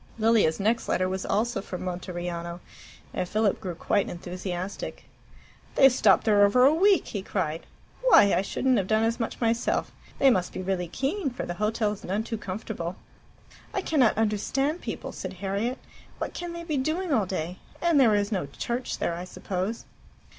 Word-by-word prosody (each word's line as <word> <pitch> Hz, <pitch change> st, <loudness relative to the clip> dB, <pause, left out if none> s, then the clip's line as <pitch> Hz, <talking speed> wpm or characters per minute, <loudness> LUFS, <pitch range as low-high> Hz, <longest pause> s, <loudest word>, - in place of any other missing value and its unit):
Lilia's 220 Hz, -7 st, +3 dB
next 220 Hz, +4 st, +1 dB
letter 185 Hz, -, +2 dB
was 190 Hz, 0 st, -3 dB
also 230 Hz, +2 st, 0 dB
from 185 Hz, -2 st, -6 dB
Monteriano, 175 Hz, -1 st, -4 dB, 0.5 s
and 180 Hz, -1 st, -2 dB
Philip 215 Hz, -1 st, +1 dB
grew 180 Hz, -4 st, -4 dB
quite 195 Hz, +4 st, 0 dB
enthusiastic. 180 Hz, +1 st, -5 dB, 0.7 s
"They've 270 Hz, -1 st, +7 dB
stopped 215 Hz, -6 st, +4 dB
there 205 Hz, -2 st, +5 dB
over 250 Hz, +6 st, +5 dB
a 285 Hz, -, +6 dB
week!" 385 Hz, +4 st, +4 dB
he 200 Hz, -, -3 dB
cried. 165 Hz, -5 st, -3 dB, 0.4 s
"Why! 205 Hz, -, +7 dB
I -, -, +3 dB
shouldn't 255 Hz, +5 st, +1 dB
have 190 Hz, -, -2 dB
done 220 Hz, +1 st, +2 dB
as 230 Hz, +2 st, 0 dB
much 230 Hz, -, -3 dB
myself. 230 Hz, 0 st, 0 dB, 0.3 s
They 270 Hz, -1 st, +6 dB
must 185 Hz, -6 st, 0 dB
be -, -, -4 dB
really 185 Hz, -2 st, -1 dB
keen, 275 Hz, -, -1 dB
for 245 Hz, -, -5 dB
the 175 Hz, -, -3 dB
hotel's 210 Hz, -1 st, 0 dB
none 200 Hz, +4 st, -1 dB
too 225 Hz, -1 st, -4 dB
comfortable." 185 Hz, -3 st, -5 dB, 0.8 s
"I 385 Hz, -, 0 dB
cannot 265 Hz, -12 st, +3 dB
understand 260 Hz, -, 0 dB
people," -, -, -5 dB
said -, -, -6 dB
Harriet. 200 Hz, +6 st, -2 dB, 0.4 s
"What -, -, -4 dB
can 350 Hz, -1 st, -5 dB
they 340 Hz, 0 st, -6 dB
be 310 Hz, -4 st, -2 dB
doing 315 Hz, +5 st, 0 dB
all 215 Hz, -7 st, +2 dB
day? 180 Hz, -1 st, -4 dB, 0.2 s
And 340 Hz, -4 st, +3 dB
there 230 Hz, -5 st, +5 dB
is 205 Hz, +1 st, 0 dB
no 185 Hz, -9 st, -1 dB
church 240 Hz, -, -3 dB
there, -, -, -1 dB
I 175 Hz, +2 st, -5 dB
suppose." 190 Hz, +4 st, -4 dB
210 Hz, 175 wpm, -27 LUFS, 185-250 Hz, 0.8 s, They've